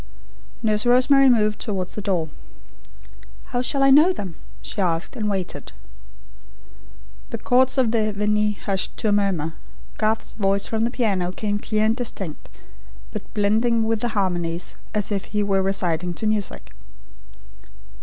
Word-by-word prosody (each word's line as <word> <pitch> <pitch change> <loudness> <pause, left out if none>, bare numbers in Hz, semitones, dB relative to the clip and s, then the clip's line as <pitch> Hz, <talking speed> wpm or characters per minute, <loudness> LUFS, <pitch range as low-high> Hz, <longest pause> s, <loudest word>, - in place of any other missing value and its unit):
Nurse 215 +1 +2
Rosemary 260 +2 +5
moved 215 -3 +2
towards 190 -5 -3
the 210 - -4
door. 180 -6 -1 1.2
"How 245 -1 -1
shall 275 +2 0
I 275 - +6
know 305 +7 +7
them?" 190 - -6 0.3
she 205 - -2
asked, 170 +4 0
and 215 -4 -2
waited. 190 -3 -4 1.6
The - - -4
chords 260 +2 +3
of 250 -4 +3
the 215 -2 +1
Veni 210 +1 +1
hushed 195 -1 -2
to 220 - 0
a - - +2
murmur, 190 -6 0 0.5
Garth's 220 +1 0
voice 200 -1 +1
from 225 0 0
the - - +1
piano 200 -8 0
came 205 +2 -2
clear 215 0 0
and 220 +1 +2
distinct, 200 - -4 0.6
but - - -7
blending 220 +3 +2
with 225 0 0
the 240 - -1
harmonies 175 -3 -1 0.2
as 210 -1 +1
if 200 -2 -1
he 210 0 -1
were 195 -1 +1
reciting 180 -3 0
to 220 - -2
music. 215 -2 -1
210 Hz, 150 wpm, -23 LUFS, 195-225 Hz, 1.6 s, know